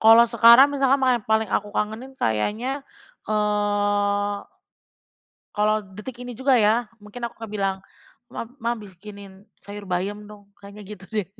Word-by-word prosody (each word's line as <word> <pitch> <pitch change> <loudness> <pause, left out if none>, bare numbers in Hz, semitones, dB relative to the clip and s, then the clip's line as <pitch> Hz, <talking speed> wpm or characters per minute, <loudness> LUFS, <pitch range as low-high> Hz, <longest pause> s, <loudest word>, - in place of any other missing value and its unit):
Kalau 225 +1 +8
sekarang 235 +4 +7
masakan 275 0 +2
ma 255 -3 +2
paling 220 -1 0
aku 205 - 0
kangenin 220 +5 -3
kayaknya, 220 - -1 0.5
eee, 205 -1 0 1.2
kalau 215 +1 +2 0.2
detik 235 +3 -8
ini 245 0 -7
juga 260 +2 +2
ya, 220 +3 +3 0.2
mungkin 235 +4 -8
aku 235 - -5
akan 225 - -6
bilang, 195 -2 -1 0.6
"Ma - - -4 0.2
Mah 235 +1 0
bikinin 200 0 -13 0.2
sayur 205 0 -8
bayam 200 +4 -3
dong" 205 -1 -15
kayaknya 200 +1 -12
gitu 195 -1 -11
deh. 210 -5 -2
210 Hz, 140 wpm, -23 LUFS, 205-235 Hz, 1.2 s, Kalau